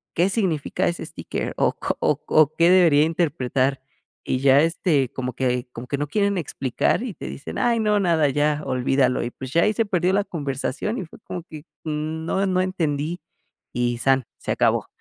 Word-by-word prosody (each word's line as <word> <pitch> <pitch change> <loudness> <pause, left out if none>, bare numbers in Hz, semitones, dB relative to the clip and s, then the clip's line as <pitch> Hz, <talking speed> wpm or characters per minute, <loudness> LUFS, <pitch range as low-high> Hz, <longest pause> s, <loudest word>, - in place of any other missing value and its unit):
¿qué 175 +3 +3
significa 190 -9 0
ese 170 - -3
sticker - - -5
o - - +2
co - - -3
o - - +1
o 155 0 +4
qué 170 +1 +4
debería 170 -5 +6
interpretar?" 140 -5 0 0.4
Y 130 - -1
ya, 135 +1 +5
este, 160 -5 +1
como 125 -1 -4
que 125 0 -1
como 120 +2 -8
que 140 - -2
no 145 - -2
quieren 200 +4 +1
explicar 135 - -1
y 245 -5 -4
te - - -8
dicen: 140 - -7
"Ay, 235 -1 +2
no, 210 -1 +2
nada, 165 -6 +2
ya 150 +1 +1
olvídalo". 130 0 +1
Y, 120 - -3
pues, 130 +1 -8
ya 170 +3 +3
ahí 215 - +2
se 225 +1 +1
perdió 180 -2 +1
la 200 +1 +2
conversación 145 - -3
y 190 - -4
fue 160 - -15
como 175 -2 -6
que, 155 -2 -10 0.2
mm, 155 +1 -3
no, 190 +3 0
no 185 -1 +1
entendí 165 -3 -2 0.5
y 120 -1 -1
san, 135 -1 +2
se - - -4
acabó, - - +1
155 Hz, 195 wpm, -23 LUFS, 135-180 Hz, 0.5 s, debería